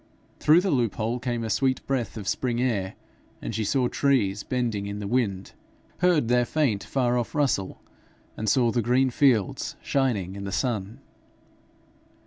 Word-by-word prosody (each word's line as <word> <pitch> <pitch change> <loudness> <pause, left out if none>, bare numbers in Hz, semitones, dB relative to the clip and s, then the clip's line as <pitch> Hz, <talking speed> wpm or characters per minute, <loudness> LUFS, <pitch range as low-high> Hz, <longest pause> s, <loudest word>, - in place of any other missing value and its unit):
Through 160 +4 +5
the 190 -1 0
loophole 115 -1 0
came 120 -1 -2
a 110 - -3
sweet 130 +1 0
breath 125 -5 -2
of 100 -3 -7
spring 120 +2 -1
air, 105 -7 -1 0.4
and - - -5
she 110 +1 -1
saw 125 +4 +1
trees 115 -8 +1
bending 115 -5 -2
in 100 0 -5
the 105 - -5
wind, 100 -4 -1 0.5
heard 175 -8 +3
their 125 +1 +3
faint 120 -8 0
far 125 -2 0
off 120 - -5
rustle, 135 -10 0 0.5
and 110 0 -2
saw 120 +1 +3
the 120 - +1
green 125 +3 +2
fields 120 -7 +1
shining 110 -9 0
in 100 - -6
the 100 - -4
sun. 110 -5 -2
120 Hz, 160 wpm, -26 LUFS, 105-130 Hz, 0.5 s, Through